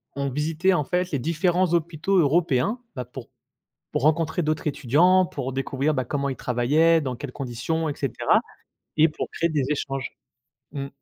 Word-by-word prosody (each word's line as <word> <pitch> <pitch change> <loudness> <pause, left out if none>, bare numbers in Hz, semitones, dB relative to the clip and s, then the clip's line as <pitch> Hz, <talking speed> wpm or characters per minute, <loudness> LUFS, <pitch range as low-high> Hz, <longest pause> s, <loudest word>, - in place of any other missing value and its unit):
on 140 0 -1
visitait 155 +7 +1
en 170 - +1
fait 180 +5 -1
les 140 - 0
différents 170 +5 +1
hôpitaux 170 +3 0
européens, 170 - +2 0.2
bah, 125 -2 -4
pour 125 +1 -10 0.6
pour - - -1
rencontrer 160 +3 +2
d'autres 155 0 -1
étudiants, 170 +8 +3
pour 150 -7 -5
découvrir, 135 +3 -1
bah, 130 -2 -1
comment 140 +2 -2
ils 135 - -3
travaillaient, 150 +9 +2
dans 130 -4 -3
quelles 125 +1 -7
conditions, 140 +6 -3
et 145 - -4
cetera 135 -5 +1 0.6
et 155 - +6
pour 150 - -5
créer 170 - 0
des 150 -4 0
échanges. 135 -3 -2 0.6
Mmh. 140 -2 -4
150 Hz, 170 wpm, -24 LUFS, 135-165 Hz, 0.6 s, et